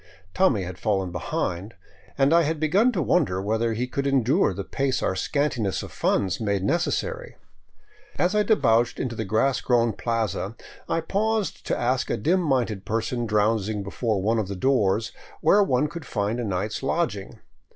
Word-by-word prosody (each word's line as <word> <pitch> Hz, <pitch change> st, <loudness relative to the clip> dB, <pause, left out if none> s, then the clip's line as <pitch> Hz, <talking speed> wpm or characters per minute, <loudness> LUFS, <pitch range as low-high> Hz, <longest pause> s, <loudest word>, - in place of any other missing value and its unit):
Tommy 130 Hz, -, +2 dB
had 90 Hz, 0 st, -7 dB
fallen 95 Hz, -4 st, 0 dB
behind, 90 Hz, +4 st, -3 dB, 0.4 s
and 135 Hz, +3 st, +4 dB
I 170 Hz, -, +6 dB
had 160 Hz, 0 st, -1 dB
begun 195 Hz, +11 st, +3 dB
to 180 Hz, -, 0 dB
wonder 135 Hz, -, +1 dB
whether 110 Hz, +3 st, 0 dB
he 120 Hz, +3 st, -1 dB
could 140 Hz, +2 st, -2 dB
endure 135 Hz, -5 st, +3 dB
the 100 Hz, +1 st, -5 dB
pace 135 Hz, +4 st, -1 dB
our -, -, 0 dB
scantiness 120 Hz, -2 st, -1 dB
of -, -, -9 dB
funds 95 Hz, -3 st, 0 dB
made 100 Hz, -4 st, -1 dB
necessary. 485 Hz, -, -1 dB, 0.8 s
As 180 Hz, +3 st, +2 dB
I 210 Hz, -, +3 dB
debouched 120 Hz, -, +2 dB
into 120 Hz, -3 st, -3 dB
the 110 Hz, -, -3 dB
grass 110 Hz, +7 st, +1 dB
grown 120 Hz, -2 st, +2 dB
plaza, 115 Hz, -2 st, -2 dB, 0.3 s
I 165 Hz, -, +1 dB
paused 210 Hz, +4 st, -1 dB
to -, -, 0 dB
ask 125 Hz, +2 st, 0 dB
a -, -, 0 dB
dim 180 Hz, +5 st, +2 dB
minded 125 Hz, -, 0 dB
person 115 Hz, +3 st, -2 dB
drowsing 105 Hz, -1 st, +1 dB
before 105 Hz, +1 st, -1 dB
one 110 Hz, +2 st, +2 dB
of 105 Hz, -, -2 dB
the 100 Hz, -, -5 dB
doors 110 Hz, -1 st, +1 dB, 0.3 s
where 205 Hz, -, +5 dB
one 150 Hz, -7 st, +2 dB
could 170 Hz, +1 st, -8 dB
find 105 Hz, +2 st, -1 dB
a -, -, -2 dB
night's 105 Hz, +1 st, -2 dB
lodging. 135 Hz, -, -2 dB
115 Hz, 170 wpm, -25 LUFS, 105-150 Hz, 0.8 s, I